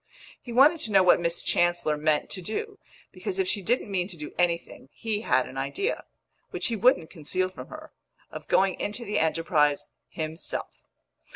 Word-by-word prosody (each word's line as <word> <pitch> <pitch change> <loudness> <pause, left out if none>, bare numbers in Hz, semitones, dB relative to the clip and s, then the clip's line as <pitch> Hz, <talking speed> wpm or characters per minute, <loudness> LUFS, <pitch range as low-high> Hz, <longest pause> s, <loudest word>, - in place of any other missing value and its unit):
He 245 - -9
wanted 285 +7 +6
to 220 - -1
know 195 -2 +6
what 180 - +6
Miss 170 0 -1
Chancellor 175 -3 +2
meant 150 0 0
to 185 - -3
do, 410 - -4 0.3
because 390 - -5
if 380 -1 +1
she 210 - 0
didn't 225 +1 0
mean 180 -2 0
to 185 -4 -10
do 150 -1 -8
anything, 170 -6 -1
he 215 -2 -3
had - - +2
an - - -6
idea 405 +5 -2 0.4
which - - -2
he 230 - -1
wouldn't 210 -7 +3
conceal 185 +3 -2
from 185 - -10
her 315 0 -10 0.4
of - - -8
going 190 -1 +2
into 225 +3 -3
the 210 - 0
enterprise 160 -2 +1 0.2
himself. 160 +1 -5
185 Hz, 180 wpm, -27 LUFS, 165-235 Hz, 0.4 s, wanted